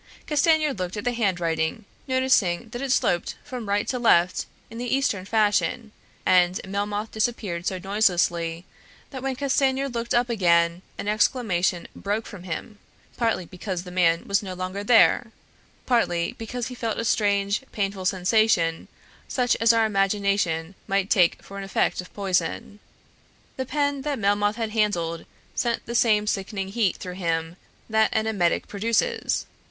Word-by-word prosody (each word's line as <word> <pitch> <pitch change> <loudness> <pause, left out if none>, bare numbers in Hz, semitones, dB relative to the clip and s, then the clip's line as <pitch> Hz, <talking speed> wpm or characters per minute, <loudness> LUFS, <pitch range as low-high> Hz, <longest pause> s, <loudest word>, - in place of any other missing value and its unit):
Castanier 305 0 +3
looked 185 -2 -4
at 210 - -4
the 245 - +1
handwriting, 175 -4 -1 0.2
noticing 250 -6 +2
that 240 +3 -6
it 275 -2 -2
sloped 175 -8 +1
from 250 -7 -6
right 205 +1 +1
to 250 - -1
left 180 -6 +3 0.2
in 230 - -7
the 245 +1 0
Eastern 215 -9 0
fashion, 210 0 +1 0.3
and 180 0 +4
Melmoth 205 +2 -3
disappeared 210 -6 -2
so 185 - -1
noiselessly 175 -4 0 0.5
that 260 -2 -6
when 265 0 -2
Castanier 270 0 +1
looked 235 -2 -2
up 240 0 +3
again 170 -6 +2 0.2
an - - -5
exclamation 210 -5 +1
broke 210 +3 -2
from 205 - -9
him, 205 +5 -6 0.4
partly 225 -7 0
because 185 0 -5
the 180 - -9
man 170 -2 +2
was 200 0 +2
no 190 -3 -6
longer 185 +2 -4
there, 230 +1 +4 0.5
partly 175 -9 +1
because 240 +2 -5
he - - -7
felt 230 -2 -3
a 230 - -2
strange 200 -1 +1
painful 195 -2 -2
sensation 185 -3 +2 0.4
such 250 -2 +1
as 230 0 +5
our 225 -1 +3
imagination 195 -4 0
might 195 0 0
take 180 -4 +3
for 200 0 -9
an - - -5
effect 195 -1 0
of 180 - -14
poison. 200 +1 -1 0.8
The 260 -1 -4
pen 285 -1 0
that 285 0 -2
Melmoth 205 0 +1
had 225 -2 -3
handled 175 -7 0 0.3
sent 235 -1 -1
the 235 - -5
same 215 -3 +3
sickening 195 -1 -2
heat 210 -2 +1
through 180 - -7
him 165 -1 -1 0.3
that 220 0 +3
an 220 0 +1
emetic 195 -6 +1
produces. 230 - 0
205 Hz, 155 wpm, -25 LUFS, 180-235 Hz, 0.8 s, as